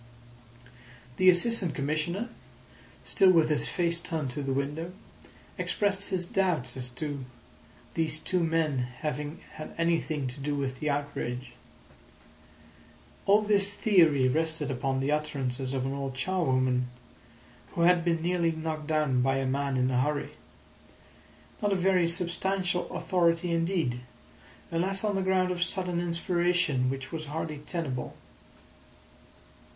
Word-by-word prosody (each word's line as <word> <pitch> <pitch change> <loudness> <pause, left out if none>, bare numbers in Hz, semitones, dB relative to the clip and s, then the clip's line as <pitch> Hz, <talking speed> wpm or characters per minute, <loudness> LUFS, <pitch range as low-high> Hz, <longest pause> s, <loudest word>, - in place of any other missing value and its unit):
The 185 - +6
Assistant 180 - +3
Commissioner, 155 - -1 0.7
still 195 -3 +4
with 165 -4 +5
his 150 -1 +1
face 170 -1 +1
turned 160 -6 -2
to 145 - -4
the 135 -1 -2
window, 145 +6 -2 0.7
expressed 200 -1 0
his 185 -3 0
doubt 170 -10 0
as 125 -1 -4
to 145 -2 -3 0.7
these 155 -2 +1
two 180 +2 0
men 160 -4 +1
having 145 +5 -4 0.2
had 155 - -8
anything 165 -3 0
to 125 - -9
do 145 +1 -2
with 130 -2 -3
the 150 - -1
outrage. 140 -3 -3 1.8
All 205 +2 +5
this 205 -1 +2
theory 165 -12 +4
rested 160 +1 0
upon 130 +1 -1
the 140 +2 0
utterances 135 -4 -1
of 130 -1 -1
an 135 - -2
old 135 -1 -4
charwoman 130 -7 +1 0.9
who - - -1
had 175 0 +5
been 165 -1 0
nearly 170 -1 +2
knocked 160 -1 -4
down 150 -5 +2
by 135 +1 +2
a 135 - -1
man 140 0 0
in 130 +1 +2
a 125 0 +2
hurry. 145 +1 -1 1.3
Not 205 -1 +2
a - - +2
very 185 -2 +3
substantial 180 +1 0
authority 170 0 +1
indeed, 165 -7 0 0.7
unless 190 +4 +1
on 210 -1 +1
the 195 - 0
ground 185 -1 +2
of 175 -1 -3
sudden 180 -1 0
inspiration, 170 -5 +1
which 135 0 -5
was 160 -1 -4
hardly 155 0 -4
tenable. 150 -4 -3
160 Hz, 135 wpm, -29 LUFS, 140-180 Hz, 1.8 s, The